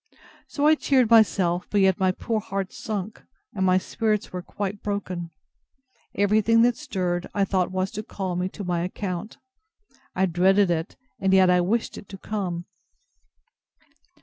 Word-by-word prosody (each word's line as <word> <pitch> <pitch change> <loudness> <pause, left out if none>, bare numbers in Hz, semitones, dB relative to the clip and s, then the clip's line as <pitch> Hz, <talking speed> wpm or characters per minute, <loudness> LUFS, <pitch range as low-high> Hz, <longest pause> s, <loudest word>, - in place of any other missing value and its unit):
So 285 - -1
I 310 - +7
cheered 260 -6 +2
myself; 185 -6 +4
but 205 - +1
yet 190 -2 +3
my 190 -1 +3
poor 220 +4 -2
heart 195 -3 -4
sunk, 215 -1 -5 0.3
and 190 - -2
my 185 0 +4
spirits 215 +2 -1
were 180 - -4
quite 200 +2 -5
broken. 185 -4 -4 0.9
Everything 215 +3 +3
that 240 0 +3
stirred, 180 -5 -3
I 200 -1 +2
thought 185 -2 0
was 185 0 -2
to 215 - -4
call 190 -4 -4
me 180 +1 -1
to 205 - -8
my 175 -2 -1
account. 185 +2 -5 0.8
I 190 - +3
dreaded 190 +2 +3
it, 165 +1 -2 0.2
and 190 0 +3
yet 185 -1 +5
I 180 0 +4
wished 220 +6 -1
it 200 - -15
to 195 - -8
come. 185 -4 -4
190 Hz, 160 wpm, -25 LUFS, 180-215 Hz, 0.9 s, I